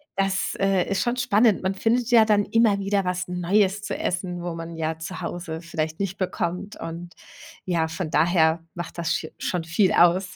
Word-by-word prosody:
das, 195 0 0
äh, 195 -2 +2
ist 195 - 0
schon 240 +1 0
spannend. 215 -4 +3
Man 190 +1 0
findet 235 +4 0
ja 230 -2 +7
dann 210 -2 +3
immer 225 -3 +3
wieder 195 0 0
was 180 0 -2
Neues 190 +3 +1
zu - - -4
essen, 180 -1 -3
wo 175 - -3
man 165 0 -7
ja 160 0 -3
zu 180 +3 -6
Hause 170 -1 -5
vielleicht 160 -2 -4
nicht 195 -1 -2
bekommt. 180 +1 -3
Und 170 +2 -7 0.5
ja, 170 -3 +1
von 160 0 -5
daher 160 0 +3
macht 175 0 -6
das 170 - -1
sche 160 - -2
schon 180 -2 -2
viel 165 +4 +2
aus. 180 +2 +3
180 Hz, 190 wpm, -24 LUFS, 170-195 Hz, 0.5 s, ja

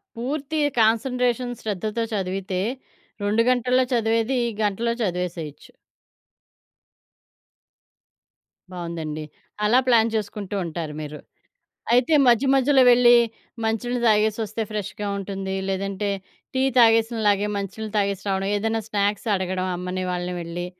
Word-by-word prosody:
పూర్తి 280 +5 -3 0.2
కాన్సంట్రేషన్ 245 +2 +1
శ్రద్ధతో 215 +2 -2
చదివితే, 190 -1 -2 0.6
2 210 +3 +2
గంటల్లో 255 +1 +2
చదివేది 230 +2 +1 0.2
గంటలో 230 +3 0
చదివేసేయొచ్చు. 175 -5 -4 3.0
బావుందండి. 165 -3 -5 0.4
అలా 240 +4 +5
ప్లాన్ 230 -2 +4
చేసుకుంటూ 205 -1 -4
ఉంటారు 160 -2 -5
మీరు. 150 0 -7 0.7
అయితే, 250 +6 +3
మధ్య 240 +3 +4
మధ్యలో 270 0 +4
వెళ్ళి 240 0 +6 0.5
మంచి 225 +1 0
నీళ్ళు 245 0 -1
దాగేసొస్తే 215 +1 +1
ఫ్రెష్‌గా 210 0 -4
ఉంటుందీ 195 -1 -4
లేదంటే 195 +1 -2 0.4
టీ 260 0 +1
తాగేసిన 225 0 +5
లాగే 205 0 +2
మంచి 200 -2 -3
నీళ్ళు 220 -1 -5
తాగేసి 200 -1 0
రావడం, 195 0 0
ఏదన్నా 225 +1 -1
స్నాక్స్ 205 +1 0
అడగడం 185 0 -2
అమ్మని, 180 +1 -4
వాళ్ళని 180 0 -3
వెళ్ళి, 170 +1 -5
210 Hz, 110 wpm, -23 LUFS, 185-235 Hz, 3.0 s, వెళ్ళి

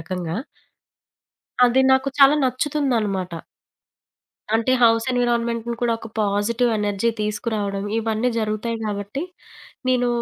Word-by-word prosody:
రకంగా. 175 0 -4 1.3
అది 245 +2 +3
నాకు 265 +1 +3
చాలా 275 +1 +7
నచ్చుతుందనమాట. 250 - 0 1.2
అంటే 230 +3 +1
హౌస్ 225 -1 +4
ఎన్విరాన్మెంట్‌ని 235 -1 0
కూడా 240 -1 +2
ఒక 225 - -10
పాజిటివ్ 215 +4 +1
ఎనర్జీ 205 +2 0
తీసుకురావడం, 210 -2 -2
ఇవన్నీ 225 +2 0
జరుగుతాయి 215 +2 -2
కాబట్టి, 205 +5 -4 0.7
నేను 250 -1 +2
225 Hz, 100 wpm, -22 LUFS, 205-245 Hz, 1.3 s, చాలా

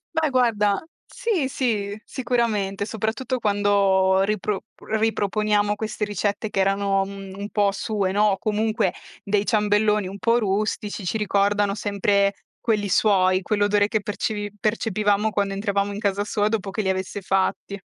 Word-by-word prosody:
Beh, 320 -1 +2
guarda, 225 -5 +2 0.2
sì, 445 - -1
sì, 215 -6 -2
sicuramente, 220 -6 -1
soprattutto 225 +4 -2
quando 200 -2 +3
ripro 210 0 -1 0.2
riproponiamo 210 -1 0
queste 215 0 -3
ricette 205 +1 -2
che 195 - -2
erano, 195 0 +2
mhmm, 195 -1 -8
un 200 +1 -5
po' 205 -2 +2
sue, 200 -2 -1
no, 205 0 +3
comunque 215 -2 0 0.3
dei 205 0 0
ciambelloni 210 -2 +2
un 195 +2 -7
po' 230 +3 +2
rustici 205 -1 -2
ci 200 - -1
ricordano 205 -1 +1
sempre 200 -1 +1 0.3
quelli 210 -3 0
suoi, 185 -2 +3
quell'odore 205 +1 +2
che 215 0 0
percevi 205 0 -3
percepivamo 210 -1 +1
quando 200 -1 0
entravamo 200 0 -1
in 200 - -5
casa 200 -1 0
sua 210 0 0
dopo 215 -3 -2
che 215 - -2
li 190 - -1
avesse 190 +1 -2
fatti. 195 +1 -1
205 Hz, 145 wpm, -23 LUFS, 200-215 Hz, 0.3 s, quando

